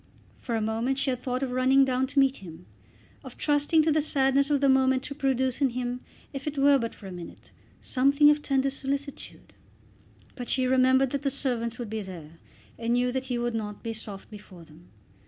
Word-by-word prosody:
For 235 - -3
a 225 - 0
moment 225 +5 -1
she 275 -1 0
had 250 - -3
thought 255 +1 -3
of 260 - -2
running 260 +2 +4
down 260 0 0
to 280 - -11
meet 270 -1 +4
him; 165 - -12 0.6
of 260 -3 -11
trusting 295 +2 +2
to 315 - +2
the 305 +1 +2
sadness 275 -1 +2
of 290 -1 +2
the 275 - +2
moment 265 0 +3
to 285 - -6
produce 265 -2 -1
in 275 - +4
him, 245 0 -3 0.3
if 275 +1 -6
it 300 -1 -3
were 280 0 +5
but 230 -1 -4
for 205 - -14
a 190 - -7
minute, 175 -2 -11 0.3
something 280 +3 +4
of 295 0 0
tender 275 -1 0
solicitude; 280 +1 -6 0.8
but 245 -2 -7
she 260 -1 +1
remembered 260 0 +3
that 280 - -2
the 280 - 0
servants 245 -4 -3
would 235 -4 -6
be 220 -1 -3
there, 165 -4 -10 0.4
and 230 0 0
knew 245 +1 +1
that 260 +1 -3
he 250 -2 -2
would 240 0 -2
not 210 -2 -5
be 230 - -3
soft 210 -2 -8
before 200 -4 -12
them. 160 +2 -18
260 Hz, 210 wpm, -27 LUFS, 230-275 Hz, 0.8 s, were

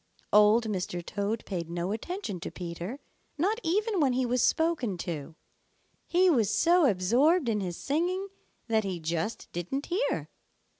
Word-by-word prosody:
Old 210 +2 +6
Mr. 180 -4 -3
Toad 205 +2 -2
paid 170 -4 -4
no 175 +2 -2
attention 225 - -4
to - - -5
Peter, 175 +8 -6 0.4
not 405 +9 +1
even 415 +3 0
when 275 -5 +3
he 255 0 +1
was 245 0 +1
spoken 315 - +1
to. 160 -3 -5 0.7
He 365 +2 +4
was 235 - +3
so 345 -2 +4
absorbed 245 - +3
in 215 -2 +1
his 180 -3 -4
singing 360 +7 -1 0.4
that 220 -2 +2
he 190 -3 -3
just 165 +6 -3
didn't 180 - -3
hear. 385 +8 -1
225 Hz, 150 wpm, -29 LUFS, -, 0.7 s, Old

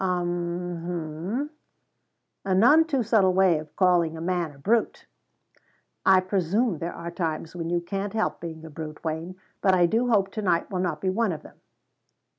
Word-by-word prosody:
"'Um 175 -1 -2
hum. 175 - -3 0.9
A 190 -1 +1
none 290 +11 +6
too 275 -6 0
subtle 200 -4 +3
way 185 -4 +4
of 155 -1 -11
calling 175 -4 +3
a - - -7
man 175 -1 -1
a 140 - -17
brute." 220 +11 0 1.0
"I 190 -1 +6
presume 190 +1 0
there 170 +1 -4
are 170 0 -6
times 165 -1 -3
when 165 -1 -4
you 175 0 0
can't 195 +3 -4
help 220 - -1
being 160 -1 -7
a 160 - -10
brute, 155 0 -8
Wayne; 165 +3 -4 0.3
but 190 -1 +4
I 175 -1 +5
do 225 +8 +1
hope 200 -5 +2
to 215 - -4
night 180 -3 0
will 185 - -2
not 180 -4 -2
be 190 - +1
one 220 +1 +1
of 155 - -6
them." - - -16
180 Hz, 185 wpm, -26 LUFS, 165-195 Hz, 1.0 s, none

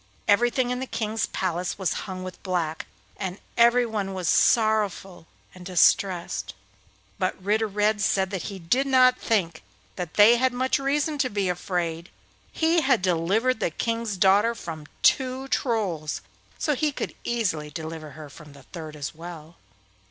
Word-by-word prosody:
Everything 240 +4 +3
in 250 - -2
the 260 - -4
King's 220 -2 -2
palace 180 -1 -2
was 190 -3 0 0.2
hung 185 0 -5
with 185 -1 -8
black, 170 -4 -2 0.3
and 190 -1 -4 0.2
everyone 230 -5 +2
was 180 -2 -3
sorrowful 210 -6 +2 0.3
and 180 - -12
distressed; 180 0 +1 0.6
but 185 0 -1
Ritter 210 +4 +1
Red 210 +1 +1
said 190 -1 +1
that 190 -3 -3
he 200 - -7
did 220 +11 0
not 255 -1 +5
think 175 -8 0 0.4
that 180 -3 -5
they 220 +3 +7
had 260 +1 +1
much 260 +3 +1
reason 290 +2 0
to 255 - +1
be 200 -3 -1
afraid—he 180 - -2
had 265 -10 +2
delivered 195 +8 +1
the - - 0
King's 230 +3 -2
daughter 205 +5 +4
from 160 -7 -8 0.2
two 260 +1 +2
Trolls, 195 - -1 0.4
so 300 - 0
he 300 +2 0
could - - -5
easily 185 -11 -1
deliver 160 0 -7
her 155 -1 -9
from 150 0 -14
the 140 -1 -15
third 155 -2 -9
as 145 -2 -5
well. 165 0 -10
195 Hz, 150 wpm, -25 LUFS, 170-235 Hz, 0.6 s, they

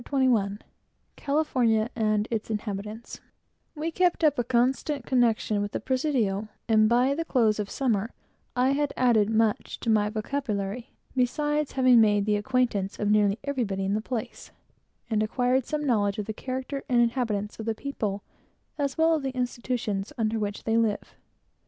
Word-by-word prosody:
CHAPTER 280 - -3
XXI 205 -5 +1 0.6
CALIFORNIA 250 -7 +1
AND 215 -2 +1
ITS 225 -1 -2
INHABITANTS 210 +1 -5 0.6
We 315 +2 -3
kept 355 0 +1
up 295 -4 +3
a - - +2
constant 255 +3 0
connection 230 -4 +2
with 205 0 -4
the - - -1
Presidio, 255 -7 0 0.2
and 215 -2 +4
by 250 +3 +3
the 330 +3 -2
close 225 -9 +2
of 205 - -2
the - - -13
summer 225 -5 0 0.5
I 255 +2 +3
had 290 +1 0
added 225 -5 +3
much 220 -1 0
to 230 - +1
my 210 -1 +3
vocabulary, 215 0 -3 0.3
beside 295 +4 0
having 255 -3 +5
made 205 -2 +3
the 210 -1 +2
acquaintance 210 -3 0
of 210 0 0
nearly 205 -1 +3
everybody 225 -9 -2
in 195 - 0
the 215 - 0
place, 225 -1 -5 0.6
and 220 -2 0
acquired 250 +3 +1
some 300 -1 -2
knowledge 205 -5 +1
of 210 - -3
the 220 - -4
character 260 +4 -5
and 240 -2 +4
habits 210 -5 -2
of 220 - -6
the 225 - 0
people, 210 -7 -4 0.6
as 280 -2 -1
well 325 +1 +4
as - - +3
of - - -5
the 265 -1 -4
institutions 240 -5 -2
under 220 -1 0
which 205 -1 -3
they 225 0 +1
live. 215 -3 -1
230 Hz, 170 wpm, -27 LUFS, 210-260 Hz, 0.6 s, having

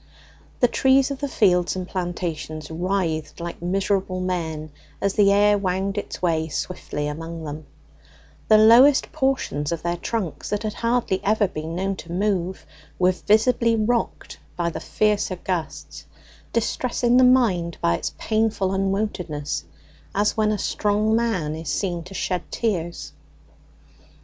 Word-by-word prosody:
The 245 - +6
trees 265 +2 +3
of 275 - -4
the 285 - -2
fields 180 -9 +2
and 185 -1 -4
plantations 170 -4 -4
writhed 170 -2 -2
like 170 0 -6
miserable 190 +1 0
men 160 -4 -3 0.3
as 200 0 0
the 200 -2 +4
air 205 +1 +4
wound 190 +1 -1
its 205 - -5
way 160 -2 +1
swiftly 150 -2 -4
among 165 +2 -6
them: 150 0 -7 0.8
the 215 - +7
lowest 240 +6 +6
portions 255 - -1
of 170 - -3
their 175 0 -1
trunks, 190 -2 -3
that 210 +1 -2
had 215 -1 -2
hardly 230 -5 0
ever 210 0 +2
been 160 -1 -6
known 195 +1 -1
to 170 - -9
move, 190 -1 -1 0.3
were 180 0 +4
visibly 225 +4 +2
rocked 230 +2 -1 0.2
by 170 -1 -1
the - - -5
fiercer 210 -3 0
gusts, 175 -2 -5 0.5
distressing 240 +1 +1
the 255 - +6
mind 215 -10 +3
by 85 - +2
its - - -3
painful 215 -3 0
unwontedness, 190 -6 -2 0.5
as 205 +1 +2
when 215 -1 +2
a 210 - 0
strong 210 +2 +1
man 210 -10 0
is 160 -1 -6
seen 175 -4 -1
to 195 - -10
shed 180 -2 -1
tears. 170 - -3
190 Hz, 145 wpm, -23 LUFS, 170-215 Hz, 0.8 s, the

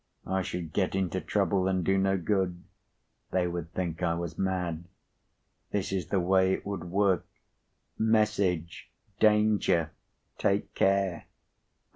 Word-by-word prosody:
"I 95 +1 0
should 85 -3 -5
get 95 -1 0
into 95 -1 -1
trouble, 95 -2 +1
and 95 -1 +1
do 95 - +3
no 95 0 +2
good. 90 -1 -1 0.7
They 90 -1 +1
would 85 -1 -5
think 85 -2 -3
I 85 -2 +1
was 85 -2 -4
mad. 90 -3 -2 0.8
This 100 -2 -2
is 95 -5 -2
the 100 - +1
way 95 +1 +3
it - - -4
would 100 -4 -4
work:—Message: 100 0 -1 0.3
'Danger! 105 -6 +3 0.5
Take 100 +1 0
care! 95 -2 +1
95 Hz, 125 wpm, -29 LUFS, 85-100 Hz, 0.8 s, do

